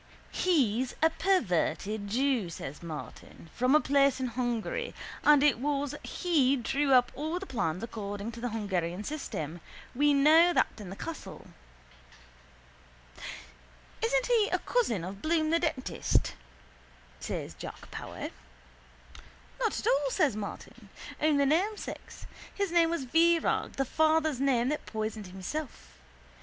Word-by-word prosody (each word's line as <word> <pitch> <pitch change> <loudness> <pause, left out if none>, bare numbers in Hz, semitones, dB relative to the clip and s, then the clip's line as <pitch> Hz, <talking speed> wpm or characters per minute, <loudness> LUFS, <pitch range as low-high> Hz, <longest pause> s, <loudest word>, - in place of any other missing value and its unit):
—He's 260 - +1
a 320 - +5
perverted 210 - 0
jew, 245 -3 +1
says 150 -3 -7
Martin, 160 0 -9
from 255 +4 +3
a - - +7
place 275 -1 +3
in 255 -1 -1
Hungary 245 - -2 0.3
and 295 -1 +6
it 295 -5 +4
was 285 0 -1
he 290 -7 +2
drew 275 +3 0
up 250 -2 +5
all 315 +5 -3
the 385 - -5
plans 185 - -2
according 205 -1 -5
to 235 - -9
the 245 - -1
Hungarian 190 -4 -2
system. 175 - -5 0.3
We 290 +3 +3
know 320 +5 +6
that - - +3
in 200 -4 -8
the 190 - -7
castle. 330 +9 -7 2.6
—Isn't - - +2
he 460 -4 +3
a - - +3
cousin 320 - 0
of 195 +3 -7
Bloom 315 -1 +1
the 335 - +3
dentist? 310 -6 0 0.9
says - - -4
Jack - - -9
Power. - - -6 1.3
—Not 455 -4 0
at - - -6
all, 275 0 +2
says 265 -3 +2
Martin. 205 -2 -8 0.3
Only 290 -2 +3
namesakes. 375 +9 -2 0.3
His 400 -3 -1
name 340 -1 +4
was 335 -5 -1
Virag, 330 +5 +2
the 270 - -1
father's 315 -1 +2
name 260 -3 +2
that 300 - -3
poisoned 215 -2 -4
himself. 190 +11 -7
275 Hz, 135 wpm, -30 LUFS, 215-315 Hz, 2.6 s, a